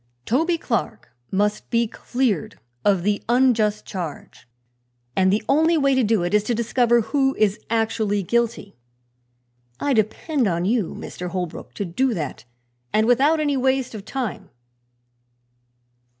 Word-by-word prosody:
"Toby 325 +8 +1
Clark 230 -6 -3 0.2
must 205 +2 -1
be 235 -1 +2
cleared 235 - -2 0.2
of 195 -4 +2
the 205 +1 0
unjust 235 -4 +2
charge, 175 - -7 0.7
and 190 0 +3
the 210 +2 +1
only 320 +4 +3
way 275 -2 +3
to 260 - +3
do 215 -4 +2
it 175 - -2
is 210 -1 +4
to 240 - 0
discover 235 +1 +2
who 270 +3 +1
is 210 0 +1
actually 220 -3 0
guilty. 230 0 -1 1.0
I 285 - +1
depend 235 +4 0
upon 170 -1 0
you, 215 -3 0
Mr. 180 - -7
Holbrook, 180 -2 -5
to 200 - -3
do 235 +8 0
that, 150 -6 -5 0.5
and 215 +1 +3
without 275 +7 +4
any 290 -2 +1
waste 265 -1 0
of 210 -3 -7
time." 245 -2 -4
225 Hz, 140 wpm, -22 LUFS, 205-260 Hz, 1.0 s, is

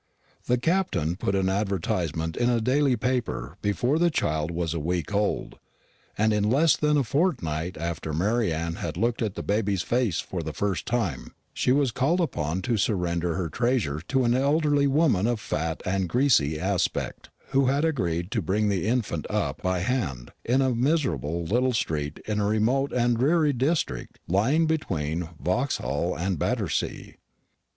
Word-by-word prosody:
The 125 - +3
Captain 120 - 0
put 95 +1 -1
an 95 -1 +1
advertisement 90 -5 -1
in 120 0 +1
a 120 -1 +2
daily 130 +3 +2
paper 115 - -2
before 120 +9 +1
the 175 0 +4
child 80 - -1
was 85 -1 -2
a 85 - -2
week 85 +4 -2
old; 105 0 -1 0.6
and 110 +1 +3
in 105 -1 +1
less 150 +6 +4
than 150 0 +2
a 140 - +3
fortnight 95 - -1
after 80 -1 -4
Mary 105 +6 +1
Anne 85 +1 -2
had 85 -1 -4
looked 115 +4 0
at 105 -3 -1
the - - -5
baby 100 -1 0
face 105 0 0
for 90 - -4
the 80 -1 -5
first 95 -3 -2
time, 110 - -2 0.2
she - - +1
was 135 -1 +3
called 140 +10 +1
upon 85 - -1
to 115 +1 0
surrender 90 -5 0
her 90 -3 -1
treasure 110 - 0
to 135 -1 +2
an 120 0 +3
elderly 145 +2 +2
woman 135 - +3
of 120 -2 0
fat 80 -4 -3
and 95 -1 0
greasy 115 - +3
aspect, 95 0 -2 0.2
who 135 -1 +3
had 140 +4 +2
agreed 90 - -1
to 115 - 0
bring 105 +5 +1
the 100 -1 0
infant 110 - -1
up - - -2
"by 90 -1 0
hand" 90 - -2
in 130 +3 +2
a 130 -1 +2
miserable 120 - 0
little 125 +7 +1
street 75 -8 -2
in 105 -1 -1
a 100 - +1
remote 120 +6 +1
and 120 -1 +2
dreary 150 +2 +3
district 140 +6 -1
lying 125 - +2
between 85 - -2
Vauxhall 70 +8 -1
and 90 -1 -1
Battersea. - - -2
105 Hz, 170 wpm, -26 LUFS, 85-130 Hz, 0.6 s, the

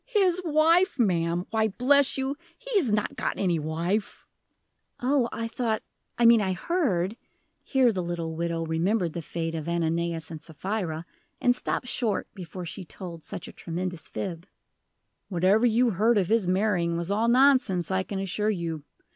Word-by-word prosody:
"His 380 -7 +2
wife, 330 +2 +3
ma'am! 175 -6 +1
Why, 220 -1 +2
bless 270 +7 +3
you, 270 +1 -1 0.2
he - - -6
has 260 - 0
not 210 0 0
got - - -2
any 175 -4 +1
wife." 170 +7 -2 0.7
"Oh, 255 -1 +2
I 230 - -3
thought 230 -2 -2 0.3
I 240 - +3
mean 230 -1 +7
I 190 -2 0
heard" 210 - 0 0.5
here 260 -3 +3
the 190 -4 -2
little 170 -2 -3
widow 165 0 -2
remembered 170 +2 0
the 170 - -4
fate 165 +1 -4
of 160 0 -4
Ananias 170 -1 -1
and 160 -2 -7
Sapphira, 170 0 -4 0.3
and 245 0 +3
stopped 250 - -2
short 230 -4 -1
before 180 -1 -7
she 180 +3 -7
told 170 -1 -9
such 175 - -7
a - - -10
tremendous 175 -1 -5
fib. 175 -2 -5 0.8
"Whatever 195 +6 +3
you 235 +1 +3
heard 215 +4 +3
of 185 -4 +1
his 220 -4 +2
marrying 180 -3 +1
was 170 +3 -2
all 220 +3 +2
nonsense, 240 - +4
I 190 0 +2
can 195 +1 -5
assure 195 +2 -1
you. 165 -6 -3
190 Hz, 165 wpm, -27 LUFS, 170-235 Hz, 0.8 s, mean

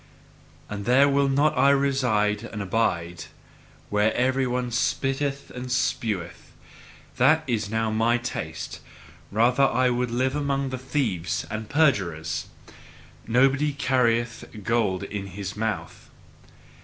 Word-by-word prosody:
And 100 -1 -6
there 130 +4 +5
will 140 0 +2
I - - 0
not 140 -1 +3
reside 120 -7 +1
and 110 -2 -7
abide 90 -5 -1 0.7
where 105 +1 +3
every 130 +1 +1
one 125 0 -2
spitteth 135 +3 -1
and 125 +1 -6
speweth: 105 -8 -2 0.6
that 150 +5 +4
is 110 -5 -1
now 110 0 0
MY 115 +2 +2
taste, 120 0 -5 0.5
rather 125 +6 +3 0.3
would 125 0 -1
I - - -6
live 130 +2 +1
amongst 140 -2 -1
thieves 115 - -2
and 110 0 -5
perjurers. 85 - +1 0.8
Nobody 135 +5 +3
carrieth 120 -4 +1 0.2
gold 105 -4 0
in 100 0 -5
his 95 -2 -5
mouth. 110 -1 -4
120 Hz, 120 wpm, -25 LUFS, 105-135 Hz, 0.8 s, there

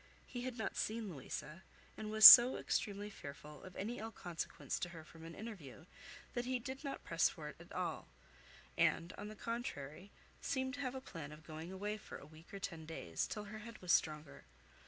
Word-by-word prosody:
He 245 - -6
had 250 -1 -4
not 220 - -3
seen 220 -3 -2
Louisa; 150 +4 -7 0.3
and 215 - -6
was 215 0 +6
so 245 +3 +13
extremely 205 0 -2
fearful 150 -3 -10
of 185 - -11
any 230 +5 -4
ill 220 +1 -5
consequence 175 -6 -5
to 175 - -3
her 165 -2 -10
from 160 +1 -14
an 165 0 -9
interview, 180 - -9 0.5
that 240 -1 -2
he 255 0 0
did 260 +4 -7
not 275 - -5
press - - +2
for - - -8
it - - -10
at - - -14
all; - - -3 0.7
and, 170 +3 +2
on 205 - -7
the 215 - -8
contrary, 200 - -5 0.3
seemed 260 -1 -1
to 280 - -7
have 260 -2 -3
a 260 - -5
plan 160 - -8
of 150 0 -13
going 160 +2 -7
away 205 +3 -3
for 215 - -9
a - - -13
week 160 +4 -16
or 200 - -6
ten 165 -5 -6
days, 85 - -3
till 210 - -5
her 210 +1 -8
head 230 +1 -10
was 180 -2 -2
stronger. 155 -1 0
200 Hz, 205 wpm, -37 LUFS, 160-230 Hz, 0.7 s, so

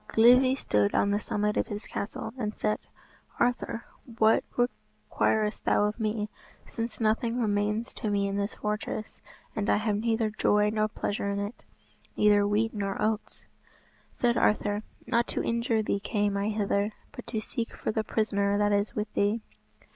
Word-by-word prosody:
Glivi 250 +3 +6
stood 105 - +1
on 200 - +3
the 205 - +2
summit 210 0 -1
of - - +1
his 205 +1 -5
castle, 220 +2 -5
and 215 -4 -3
said, 215 - 0 0.6
"Arthur, 240 -1 0 0.3
what 220 0 +5
requirest 220 -3 -1
thou - - +3
of 210 +3 -1
me, 215 -1 -1 0.4
since 230 0 -5
nothing 230 +2 +1
remains 210 +1 0
to 215 - -3
me 200 -1 +1
in 195 - -2
this 200 +1 -2
fortress, 210 0 -4 0.3
and 210 -2 -1
I - - +4
have 210 -1 0
neither 225 0 +1
joy 210 0 +3
nor 215 0 +1
pleasure 205 -1 -2
in 200 - -1
it; 205 +3 -5 0.5
neither 205 -1 +5
wheat 215 +2 +1
nor 200 -2 -2
oats?" 215 0 -1 0.7
Said 240 -1 +1
Arthur, 205 -1 +2 0.2
"Not 235 -1 +1
to - - -2
injure 230 -1 +1
thee 200 - 0
came 205 -1 0
I 200 +1 0
hither, 205 0 0 0.2
but - - -10
to 220 - -2
seek 230 +2 -4
for - - -1
the 220 0 0
prisoner 205 -2 +1
that 205 0 +2
is 205 +1 +1
with 210 0 -3
thee." 205 +3 +1
215 Hz, 170 wpm, -28 LUFS, 205-225 Hz, 0.7 s, Glivi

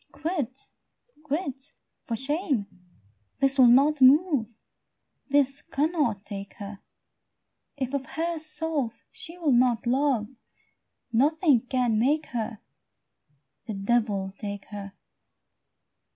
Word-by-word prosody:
Quit, 285 -4 -3 0.6
quit, 285 -2 -3 0.4
for 230 - -2
shame; 270 - 0 0.7
this 275 0 +2
will 255 - +9
not 275 +4 +5
move, 265 - +4 0.7
This 275 -1 +2
cannot 290 - -1
take 200 -1 -7
her; 200 -2 -8 1.0
If 260 0 -3
of 275 -2 -2
herself 315 -5 -2
she 335 +1 -7
will 325 -5 +1
not 245 -2 +3
love, 255 -3 +1 0.9
Nothing 285 0 +3
can 245 -4 +1
make 295 +6 +2
her: 225 -2 -3 1.1
The 215 - -4
devil 200 -2 0
take 200 -1 -5
her! 200 -1 -7
265 Hz, 100 wpm, -26 LUFS, 225-300 Hz, 1.1 s, will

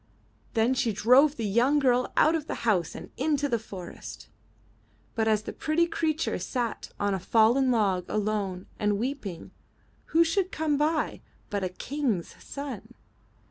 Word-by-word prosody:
'' - - -35
Then 225 +3 +3
she 240 -3 +1
drove 255 +8 +5
the 230 - -3
young 240 +8 +3
girl 255 -3 +2
out 315 - +5
of 315 -2 -2
the - - -5
house 190 -7 +1
and - - -9
into 290 0 +1
the 235 -4 0
forest. 195 -4 -9 0.8
But 220 -1 0
as 215 -1 +2
the - - -6
pretty 320 +2 +1
creature 320 - -1
sat 235 +5 -3
on 205 -1 +1
a 190 - -1
fallen 230 +7 +3
log 200 -7 +2
alone 205 -3 -1
and 210 -1 +1
weeping, 225 - -4 0.5
who 330 +1 +4
should 370 +3 0
come 310 -2 0
by 305 +2 0 0.3
but 200 -1 -1
a 185 - 0
King's 235 - -2
son. 245 -5 -7
240 Hz, 160 wpm, -27 LUFS, 210-290 Hz, 0.8 s, drove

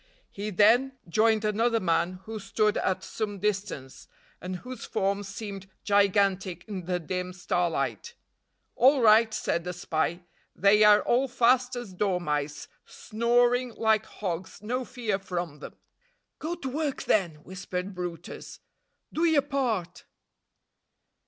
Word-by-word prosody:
He 205 +1 -5
then 235 +7 +4
joined 220 +4 +2
another 225 +2 +2
man 180 0 0
who 220 0 -6
stood 210 +2 +1
at 190 - -1
some 210 -2 -4
distance, 190 -9 -3 0.3
and 185 0 -4
whose 250 +6 -8
form 200 +1 -1
seemed 195 -1 -7
gigantic 195 -3 +2
in 190 -5 -5
the 180 0 -1
dim 180 +2 -4
starlight. 165 - -2 0.6
"All 265 +1 +5
right," 220 +1 +6
said 170 -5 -1
the 180 +1 -4
spy, 170 0 -1 0.3
"they 205 +2 +5
are 210 0 +7
all 255 +3 +2
fast 250 0 +3
as 240 -6 -6
dormice, 155 -7 -1 0.2
snoring 240 +2 +1
like 220 -1 +2
hogs; 185 -3 -5
no 250 +4 -2
fear 230 -6 -2
from 175 -5 -4
them." - - -9 0.6
"Go 330 +3 -3
to 310 -6 -6
work, 290 +1 -2
then," 180 -7 +1
whispered 185 +1 -5
brutus. 175 -2 -7 0.5
"Do 325 - 0
your 315 -4 +4
part." 255 - -2
205 Hz, 130 wpm, -27 LUFS, 180-235 Hz, 0.6 s, are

